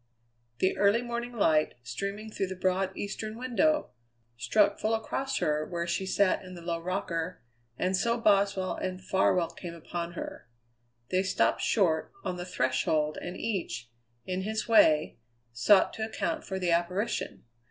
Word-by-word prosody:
The 185 Hz, -, +2 dB
early 205 Hz, +4 st, +4 dB
morning 240 Hz, 0 st, -4 dB
light, 155 Hz, -9 st, +2 dB
streaming 200 Hz, -, -5 dB
through 195 Hz, -, -2 dB
the 190 Hz, -, -5 dB
broad 185 Hz, +1 st, 0 dB
eastern 215 Hz, +2 st, -4 dB
window, 300 Hz, +5 st, +1 dB, 0.4 s
struck 200 Hz, -, +2 dB
full 220 Hz, +1 st, +1 dB
across 270 Hz, +5 st, -2 dB
her 150 Hz, 0 st, +1 dB
where 170 Hz, +1 st, -3 dB
she 180 Hz, +3 st, -1 dB
sat 195 Hz, 0 st, +2 dB
in 185 Hz, 0 st, -9 dB
the 170 Hz, -, -10 dB
low 170 Hz, -1 st, -2 dB
rocker; 175 Hz, -2 st, -3 dB, 0.3 s
and 185 Hz, +1 st, +1 dB
so 235 Hz, +5 st, +1 dB
Boswell 200 Hz, -3 st, +3 dB
and 185 Hz, -1 st, -3 dB
Farwell 185 Hz, -2 st, +2 dB
came 170 Hz, -2 st, -8 dB
upon 170 Hz, +1 st, -5 dB
her. 170 Hz, -, -7 dB, 0.6 s
They 185 Hz, -, +3 dB
stopped 190 Hz, 0 st, +1 dB
short 170 Hz, -7 st, +2 dB
on 180 Hz, -, -3 dB
the 180 Hz, -, -5 dB
threshold 150 Hz, 0 st, 0 dB
and 180 Hz, +1 st, -6 dB
each, 120 Hz, -, -3 dB, 0.3 s
in 185 Hz, 0 st, -2 dB
his 215 Hz, +3 st, -2 dB
way, 155 Hz, -, +4 dB, 0.3 s
sought 190 Hz, -, +5 dB
to 220 Hz, -, -4 dB
account 195 Hz, -6 st, -3 dB
for 190 Hz, -, -3 dB
the 180 Hz, -2 st, 0 dB
apparition. 180 Hz, +6 st, -1 dB
185 Hz, 155 wpm, -29 LUFS, 170-210 Hz, 0.6 s, sought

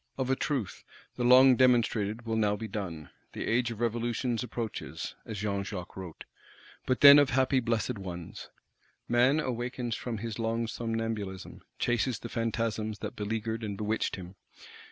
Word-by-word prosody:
Of 130 Hz, -1 st, -1 dB
a -, -, +3 dB
truth, 130 Hz, -9 st, -3 dB, 0.3 s
the 125 Hz, -, -2 dB
long 130 Hz, +1 st, +7 dB
demonstrated 115 Hz, -3 st, +2 dB
will 115 Hz, -1 st, -1 dB
now 105 Hz, -2 st, +2 dB
be 110 Hz, +1 st, -5 dB
done: 90 Hz, -9 st, -6 dB, 0.2 s
"the -, -, -4 dB
Age 120 Hz, +1 st, +1 dB
of 115 Hz, -2 st, -7 dB
Revolutions 120 Hz, 0 st, -1 dB
approaches" 115 Hz, -2 st, -5 dB
(as 110 Hz, -, -5 dB
Jean 100 Hz, -1 st, -1 dB
Jacques 95 Hz, -3 st, -7 dB
wrote), 90 Hz, -4 st, -8 dB, 0.6 s
but 130 Hz, -, +1 dB
then 140 Hz, 0 st, +11 dB
of 145 Hz, -2 st, +4 dB
happy 130 Hz, +1 st, +2 dB
blessed 115 Hz, -1 st, -1 dB
ones. 90 Hz, -3 st, -7 dB, 0.6 s
Man 125 Hz, +5 st, +4 dB
awakens 120 Hz, -2 st, -3 dB
from 120 Hz, -3 st, -4 dB
his 115 Hz, +1 st, -5 dB
long 115 Hz, +1 st, 0 dB
somnambulism; 115 Hz, -4 st, -4 dB, 0.2 s
chases 120 Hz, 0 st, 0 dB
the 120 Hz, -, -8 dB
Phantasms 115 Hz, -2 st, -2 dB
that -, -, -6 dB
beleagured 110 Hz, +2 st, -3 dB
and 100 Hz, -2 st, -4 dB
bewitched 110 Hz, +2 st, -1 dB
him. 90 Hz, -1 st, -9 dB
115 Hz, 155 wpm, -29 LUFS, 105-120 Hz, 0.6 s, then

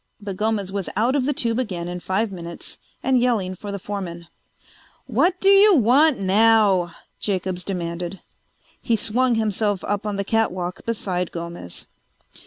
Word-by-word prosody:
But 200 Hz, -2 st, -6 dB
Gomez 210 Hz, -2 st, -1 dB
was 195 Hz, -5 st, -3 dB
out 230 Hz, +6 st, +2 dB
of 270 Hz, -2 st, +1 dB
the -, -, +2 dB
tube 235 Hz, -3 st, 0 dB
again 180 Hz, -8 st, -3 dB
in 180 Hz, 0 st, -5 dB
five 195 Hz, +4 st, -1 dB
minutes 170 Hz, -2 st, -8 dB, 0.2 s
and 260 Hz, -1 st, +3 dB
yelling 220 Hz, -7 st, +1 dB
for 200 Hz, +2 st, -7 dB
the 200 Hz, -, -3 dB
foreman. 180 Hz, -4 st, -6 dB, 0.8 s
"What 325 Hz, -, +1 dB
do 390 Hz, -, +3 dB
you 395 Hz, 0 st, +7 dB
want 270 Hz, +4 st, +4 dB
now?" 195 Hz, -3 st, +3 dB, 0.2 s
Jacobs 185 Hz, -2 st, -2 dB
demanded. 175 Hz, -1 st, -4 dB, 0.6 s
He 230 Hz, -, +1 dB
swung 240 Hz, +3 st, +1 dB
himself 210 Hz, -2 st, 0 dB
up 205 Hz, +1 st, -2 dB
on 205 Hz, -, -2 dB
the 200 Hz, -, -1 dB
catwalk 185 Hz, -4 st, -1 dB
beside 185 Hz, -6 st, -2 dB
Gomez. 170 Hz, -, -6 dB
205 Hz, 155 wpm, -22 LUFS, 180-230 Hz, 0.8 s, you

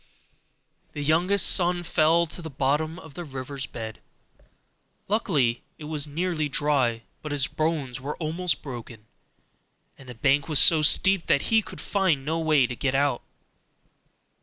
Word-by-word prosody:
The 145 Hz, -, -5 dB
youngest 175 Hz, +6 st, +3 dB
son 175 Hz, -1 st, +3 dB
fell 170 Hz, 0 st, +2 dB
to 170 Hz, +2 st, -8 dB
the 160 Hz, -, -7 dB
bottom 145 Hz, +4 st, -1 dB
of 160 Hz, -5 st, -13 dB
the 175 Hz, -, -7 dB
river's 135 Hz, -2 st, -6 dB
bed: 110 Hz, -2 st, -8 dB, 1.1 s
luckily 150 Hz, -, 0 dB, 0.2 s
it -, -, -12 dB
was 150 Hz, -1 st, -2 dB
nearly 155 Hz, 0 st, -2 dB
dry, 135 Hz, -6 st, 0 dB, 0.2 s
but 150 Hz, -, -7 dB
his 140 Hz, -2 st, 0 dB
bones 150 Hz, -5 st, -3 dB
were 145 Hz, +3 st, -5 dB
almost 165 Hz, -2 st, -2 dB
broken, 120 Hz, -5 st, -9 dB, 0.9 s
and 135 Hz, -2 st, -14 dB
the 125 Hz, -, -9 dB
bank 140 Hz, +5 st, +1 dB
was 155 Hz, -, +3 dB
so 160 Hz, +1 st, +6 dB
steep 190 Hz, +4 st, +4 dB
that 140 Hz, -, +1 dB
he 220 Hz, -, +5 dB
could -, -, -11 dB
find 175 Hz, -9 st, 0 dB
no 160 Hz, +2 st, -1 dB
way 155 Hz, -5 st, +3 dB
to 125 Hz, 0 st, -5 dB
get 135 Hz, +2 st, -2 dB
out. 140 Hz, -3 st, +1 dB
150 Hz, 155 wpm, -25 LUFS, 135-165 Hz, 1.1 s, so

